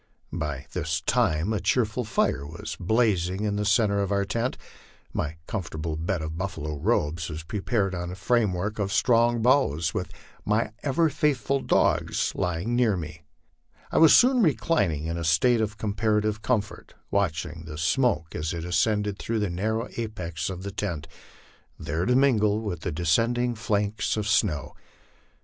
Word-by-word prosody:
By 75 -4 -3
this 80 -2 -1
time 95 -2 +1
a 105 - 0
cheerful 125 0 +1
fire 70 -9 0
was 80 +4 -7
blazing 95 -2 +1
in 105 -1 0
the 105 0 -1
centre 105 -1 +3
of 100 0 -2
our 100 0 +1
tent; 115 +5 -2 0.6
my 75 +1 -3
comfortable 80 -5 -4
bed 80 +1 -2
of 80 +1 -5
buffalo 75 -6 -4
robes 85 -4 0
was 80 0 -6
prepared 100 +2 -1
on 90 -1 -4
a 90 - -6
framework 105 0 0
of 100 -1 -1
strong 120 0 +3
boughs, 115 - +3
and - - -21
with 90 - -3 0.3
my 110 +1 0
ever 155 +4 +2
faithful 140 -2 +1
dogs - - +1
lying 90 +7 -1
near 115 -5 +3
me, 80 -1 -7 0.7
I - - +2
was 160 -1 +8
soon 250 0 +5
re 155 - +4
clining 90 - 0
in 85 +1 -2
a - - -3
state 100 +9 +3
of 105 -1 -2
comparative 105 0 0
comfort, 110 -4 -2 0.2
watching 85 -4 -1
the 75 -1 -7
smoke 80 - +1
as 75 +2 -3
it 85 0 -5
ascended 105 +2 0
through 115 - -2
the 100 -4 -1
narrow 110 +6 -1
apex 90 -9 -4
of 95 -1 -6
the 100 - -4
tent, 85 -6 -4 0.7
there 80 +5 -2
to 125 - +3
mingle 110 -6 +3
with 100 -7 -4
the 90 - -3
descending 115 +10 +1
flakes 105 -1 -1
of 105 -1 -2
snow. 100 - +1
100 Hz, 165 wpm, -26 LUFS, 85-115 Hz, 0.7 s, was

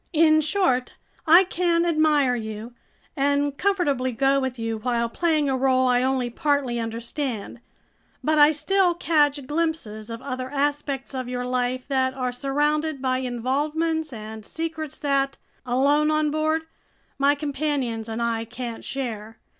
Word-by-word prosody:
In 310 -1 +5
short, 305 -6 +1 0.3
I 340 +4 +8
can 345 -2 +1
admire 305 -6 +3
you 220 +1 -6 0.4
and 285 0 +1
comfortably 290 -9 +1
go 270 +3 +2
with 260 -2 -3
you 225 -1 -3
while 235 0 0
playing 310 +3 +1
a 265 - +1
role 260 0 +2
I 250 0 +3
only 260 -2 0
partly 275 -3 0
understand; 230 0 -4 0.6
but 310 0 +2
I 295 +1 +8
still 360 +3 +2
catch 295 -5 +2
glimpses 295 -9 -2
of 230 0 -5
other 255 -1 -4
aspects 285 -1 -2
of 255 -2 -4
your 250 0 -3
life 250 0 -1
that 260 -1 0
are 255 -2 -1
surrounded 295 +3 0
by 255 -1 0
involvements 295 +6 -1
and 220 -1 -8
secrets 320 +3 -5
that, 275 -1 0 0.3
alone 285 +5 +3
on 305 -1 +1
board, 310 +1 0 0.6
my 280 +1 +4
companions 280 -6 -2
and 225 +1 -2
I 230 -1 0
can't 235 0 -6
share. 225 -5 -5
275 Hz, 145 wpm, -24 LUFS, 245-305 Hz, 0.6 s, I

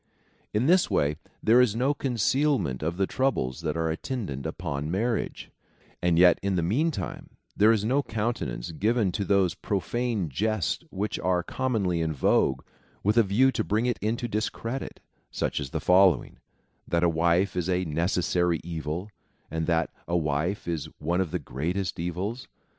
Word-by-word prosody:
In 105 +4 +1
this 180 +4 +4
way, 75 +1 +1 0.3
there 115 +3 +6
is 115 -4 +2
no 130 +5 +2
concealment 130 - +1
of 80 +3 -2
the 95 - +2
troubles 95 - -1
that 80 -1 -2
are 80 -1 0
attendant 80 - -4
upon 80 -3 -4
marriage; 110 +6 -2 0.5
and 90 -2 +2
yet, 90 0 +6
in 100 -1 0
the 85 - +1
meantime, 115 - -1 0.3
there 105 +2 +5
is 105 -2 +1
no 135 +5 +2
countenance 110 - -3
given 105 +3 +1
to 100 - -2
those 100 -4 +2
profane 105 +2 -2
jests 105 - -1
which 105 +3 -3
are 90 -1 +1
commonly 100 -8 -1
in 80 -1 0
vogue 65 -1 +2 0.4
with 105 +2 +2
a 120 - +7
view 115 +6 +3
to 115 - -1
bring 110 +3 0
it 120 -2 0
into 115 +3 -1
discredit, 115 +4 -3 0.3
such - - -2
as 70 - -4
the - - -3
following: 90 -4 +3 0.5
that' 85 0 +1
a - - +5
wife 85 +3 +2
is 90 0 -1
a 90 0 +1
necessary 85 +1 +1
evil, 80 +2 -4 0.4
and 80 0 -2
that 85 -2 +1 0.2
a 85 - +1
wife 80 +5 -1
is 85 -4 -2
one 85 +4 0
of 90 - -1
the 90 - -1
greatest 90 +6 -3
evils. 95 +8 -3
95 Hz, 165 wpm, -27 LUFS, 80-110 Hz, 0.5 s, a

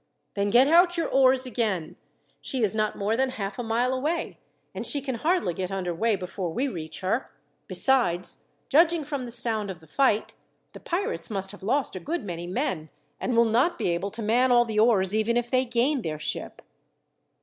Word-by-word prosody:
"Then 200 0 0
get 245 +5 +6
out 350 +3 +5
your 335 - 0
oars 260 -1 +4
again. 210 -9 -2 0.4
She 260 -3 -3
is 210 - +3
not 215 -1 -1
more 205 +2 0
than 265 +2 +1
half 200 -5 -5
a - - -2
mile 235 +3 0
away, 305 +6 -2 0.3
and - - -5
she 290 - +1
can 270 -1 -4
hardly 300 - 0
get 185 +2 -4
under 185 -2 -2
way 220 +6 +1
before 180 -1 -4
we 255 +11 -1
reach 160 - -6
her. 195 +8 -1 0.4
Besides, 185 -10 +1 0.3
judging 330 +2 +4
from 275 -3 -4
the 240 - -8
sound 230 -3 0
of 185 -3 -6
the 160 - -18
fight, 220 - +1 0.4
the - - -10
pirates 400 +7 -3
must 195 -2 -1
have 205 - -13
lost 255 +4 0
a - - -4
good 335 - -3
many 175 -2 -5
men, 185 - -2 0.3
and 245 -2 -1
will 235 - +6
not 245 +10 +2
be - - -1
able 175 +3 -1
to 220 +2 -6
man 245 +4 +3
all 240 0 +5
the 220 -2 -1
oars 205 -4 +3
even 220 +2 +1
if 240 0 -2
they 255 0 +3
gain 250 +3 +1
their 155 -6 -4
ship." 155 - -4
230 Hz, 205 wpm, -26 LUFS, 195-265 Hz, 0.4 s, get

